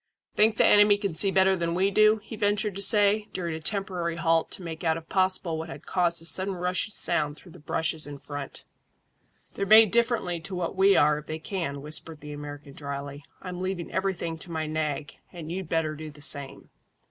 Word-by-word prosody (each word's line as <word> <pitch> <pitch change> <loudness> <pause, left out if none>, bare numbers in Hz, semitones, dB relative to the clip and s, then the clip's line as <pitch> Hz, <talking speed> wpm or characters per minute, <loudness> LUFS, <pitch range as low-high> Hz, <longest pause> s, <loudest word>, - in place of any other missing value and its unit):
"Think 220 +1 +3
the - - +5
enemy 205 0 +6
can 200 -4 -3
see 160 +5 +3
better 190 0 +4
than 170 -1 -2
we 190 +2 +2
do?" 215 +2 +5
he 220 - -8
ventured 205 -1 0
to 200 - -4
say, 210 +1 +4
during 170 -3 -3
a 160 - -5
temporary 180 -1 -2
halt 165 -1 +1
to 185 - -6
make 165 0 -7
out 160 -1 +1
if 165 0 -10
possible 185 -4 0
what 160 +1 -6
had - - -10
caused 170 -2 0
a - - -12
sudden 190 +3 0
rushing 180 +3 -1
sound 150 -4 0
through 175 - -15
the - - -14
bushes 155 0 -1
in 145 -1 -7
front. 145 0 -7 0.9
"They're 200 - -3
made 215 -1 +8
differently 230 -6 +1
to 185 +3 -7
what 175 0 -3
we 195 +1 +5
are 150 0 +4
if 150 - -14
they 155 - -4
can," 160 -5 -4
whispered 155 +1 -5
the 150 0 -8
American 145 -1 -9
dryly. 140 0 -6 0.2
"I'm 180 -1 -6
leaving 185 -2 -3
everything 185 -4 -2
to 175 - -6
my 160 -1 -2
nag, 155 -2 -3
and 165 -3 -8
you'd 185 -2 -5
better 160 -2 0
do 155 0 -8
the 145 0 -14
same." 140 -1 0
170 Hz, 210 wpm, -27 LUFS, 155-195 Hz, 0.9 s, made